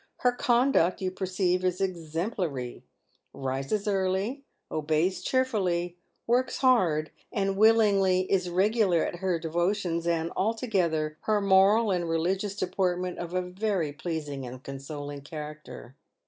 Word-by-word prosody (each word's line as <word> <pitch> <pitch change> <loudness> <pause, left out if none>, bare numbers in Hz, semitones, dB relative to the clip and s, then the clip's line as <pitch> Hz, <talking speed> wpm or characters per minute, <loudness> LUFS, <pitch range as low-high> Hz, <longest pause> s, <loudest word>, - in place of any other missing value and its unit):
" - - -51
Her 250 - +5
conduct, 245 -6 +2
you 185 -1 -2
perceive, 185 -1 0
is 185 0 0
exemplary 165 - -3 0.3
— - - -43
rises 135 +10 -2
early 195 +7 0
— - - -46
obeys 155 +4 0
cheerfully 185 -10 0 0.2
— - - -47
works 250 +2 +1
hard 180 - +3 0.2
and 195 -3 0
willingly 200 -3 +4
— - - -18
is 185 -2 +2
regular 190 -1 +2
at - - -4
her 185 -1 0
devotions, 170 +1 -1
and, 165 -1 0
altogether, 185 -8 0
her 215 -1 +2
moral 200 +3 +4
and 175 -2 -1
religious 190 +5 0
deportment 180 -2 -1
of 175 +1 -5
a 185 - +1
very 180 -4 -2
pleasing 150 -4 -4
and 125 +1 -8
consoling 145 +1 -7
character." 150 -3 -9
185 Hz, 140 wpm, -28 LUFS, 160-200 Hz, 0.3 s, Her